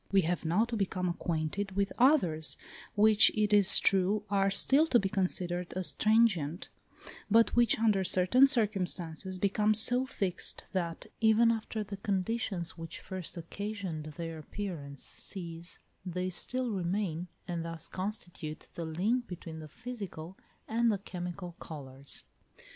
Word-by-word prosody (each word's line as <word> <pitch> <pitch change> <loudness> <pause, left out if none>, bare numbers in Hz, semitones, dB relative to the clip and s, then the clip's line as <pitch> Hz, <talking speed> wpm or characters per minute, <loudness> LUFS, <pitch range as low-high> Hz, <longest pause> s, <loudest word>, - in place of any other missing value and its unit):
We 195 -1 +5
have 175 0 -2
now 180 +8 +2
to 235 0 -4
become 185 -3 -1
acquainted 175 +3 -2
with 200 0 -1
others, 180 - +3 0.4
which 215 0 +7
it 210 0 +2
is 205 -2 +9
true 195 +2 +2
are 195 -1 +3
still 275 +10 +4
to 250 - +4
be 195 -4 0
considered 180 -2 -1
as 185 -1 +2
transient, 205 -8 +2 0.6
but 225 +2 +4
which, 240 -1 +4
under 215 -4 +2
certain 190 +9 +5
circumstances, 190 -6 -1
become 210 +3 +2
so 245 +4 +4
fixed 190 -8 0
that, 170 -3 -3
even 225 +1 +5
after 220 -1 -3
the 200 -1 -7
conditions 195 -3 -2
which 165 -1 -7
first 185 -2 -7
occasioned 185 -2 -5
their 165 -1 -5
appearance 155 -5 -6
cease, 170 -2 -8 0.3
they 180 0 -3
still 250 +7 -2
remain, 180 -2 -2 0.2
and 170 -2 -3
thus 165 0 -7
constitute 175 -5 -6
the 170 - -5
link 210 +10 -1
between 165 -3 -8
the 155 - -9
physical 200 - -8 0.3
and 230 +1 +2
the 205 - 0
chemical 180 -1 -6
colours. 140 -3 -9
190 Hz, 140 wpm, -31 LUFS, 170-215 Hz, 0.6 s, is